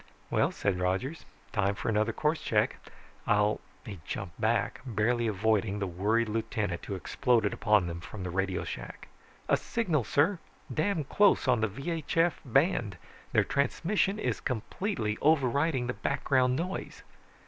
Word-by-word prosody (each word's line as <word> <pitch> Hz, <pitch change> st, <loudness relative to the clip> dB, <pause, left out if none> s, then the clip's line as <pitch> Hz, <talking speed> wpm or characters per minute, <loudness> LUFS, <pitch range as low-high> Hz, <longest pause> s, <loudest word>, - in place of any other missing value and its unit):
"Well," -, -, +2 dB
said 95 Hz, -2 st, -1 dB
Rogers, 95 Hz, -, -1 dB, 0.3 s
"time 100 Hz, -1 st, +1 dB
for -, -, -5 dB
another 110 Hz, +1 st, +2 dB
course 155 Hz, +7 st, 0 dB
check. -, -, +1 dB, 0.5 s
I'll 105 Hz, 0 st, +2 dB
..." -, -, -30 dB
He 100 Hz, -6 st, -7 dB
jumped -, -, -6 dB
back, -, -, +1 dB
barely 120 Hz, 0 st, +1 dB
avoiding 105 Hz, 0 st, +1 dB
the 100 Hz, -, -1 dB
worried 105 Hz, +6 st, +1 dB
lieutenant 105 Hz, -4 st, -2 dB
who 100 Hz, -, -4 dB
exploded 110 Hz, +3 st, +1 dB
upon 105 Hz, -4 st, +3 dB
them 85 Hz, 0 st, -4 dB
from 95 Hz, +2 st, -8 dB
the 90 Hz, -, -4 dB
radio 95 Hz, 0 st, -1 dB
shack. -, -, -7 dB, 0.4 s
"A -, -, +4 dB
signal, 175 Hz, -, 0 dB
sir! 165 Hz, -, +2 dB, 0.3 s
Damn 170 Hz, 0 st, 0 dB
close, 200 Hz, +3 st, +3 dB
on 125 Hz, -3 st, +3 dB
the 110 Hz, -, +3 dB
VHF 165 Hz, -, 0 dB
band, 130 Hz, -, +1 dB, 0.3 s
their -, -, +4 dB
transmission 190 Hz, +8 st, 0 dB
is -, -, -1 dB
completely 120 Hz, -, -2 dB
overriding 140 Hz, -2 st, +2 dB
the 125 Hz, -, -2 dB
background 130 Hz, -1 st, +1 dB
noise." 180 Hz, +6 st, -4 dB
115 Hz, 150 wpm, -29 LUFS, 105-150 Hz, 0.5 s, A